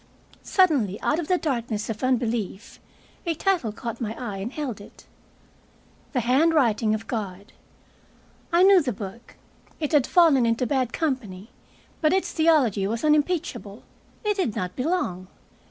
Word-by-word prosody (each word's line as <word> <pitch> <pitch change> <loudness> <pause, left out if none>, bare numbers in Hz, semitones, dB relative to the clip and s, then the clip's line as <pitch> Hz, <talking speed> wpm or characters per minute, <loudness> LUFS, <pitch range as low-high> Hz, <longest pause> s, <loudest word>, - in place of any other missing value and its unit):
Suddenly, 275 - +2
out 305 - +1
of 330 - -4
the 365 - +2
darkness 235 -9 -2
of 220 0 -5
unbelief, 230 -5 -2 0.4
a 335 -2 -1
title 345 - 0
caught 230 +2 -6
my 220 -1 -3
eye 230 -6 -5
and 200 +5 -5
held 270 -9 -5
it, - - -15 1.1
"The 250 - +1
Handwriting 250 -4 +3
of 220 +1 -6
God." 205 -3 -5 1.0
I 345 +2 +5
knew 385 -1 +7
the 255 -5 -2
book. 205 +4 -9 0.4
It 300 -3 -2
had 290 -5 +3
fallen 310 -9 +5
into 230 +2 +1
bad 255 -2 0
company, 235 - -3 0.5
but 310 0 +3
its 380 - 0
theology 280 - +2
was 225 +2 -3
unimpeachable. 300 - 0 0.4
It 420 -1 0
did 255 - -1
not 180 0 -3
belong. 250 - -2
250 Hz, 145 wpm, -24 LUFS, 215-315 Hz, 1.1 s, knew